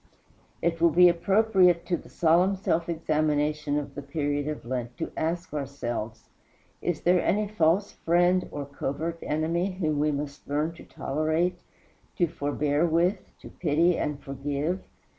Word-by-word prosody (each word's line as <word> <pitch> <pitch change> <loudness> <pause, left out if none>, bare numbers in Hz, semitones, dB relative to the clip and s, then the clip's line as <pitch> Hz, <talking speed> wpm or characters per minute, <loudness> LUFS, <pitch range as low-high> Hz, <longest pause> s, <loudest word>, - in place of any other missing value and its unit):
It 165 0 0
will 170 - +6
be 180 +2 +7
appropriate 185 -1 +3
to 180 - 0
the - - -10
solemn 175 +4 +3
self 170 -3 -1
examination 150 -2 0
of 145 - -4
the 145 - -6
period 145 0 -2
of 150 -5 -4
Lent 120 -1 -4
to - - -4
ask 170 +1 -2
ourselves, 120 -6 -4 0.5
Is 175 - -2
there 180 0 +3
any 210 +2 +1
false 200 0 +2
friend 175 +2 +2
or 145 -1 -5
covert 145 +4 -4
enemy 170 +5 -1
whom 155 -5 -1
we 150 +1 +2
must 145 0 -5
learn 150 +3 0
to - - -13
tolerate, 155 +5 -1 0.6
to 175 - +3
forbear 145 0 -1
with, 175 +4 +2 0.2
to - - -10
pity 165 +2 +2
and 150 -1 -2
forgive? 145 +6 -3
160 Hz, 150 wpm, -27 LUFS, 145-175 Hz, 0.6 s, be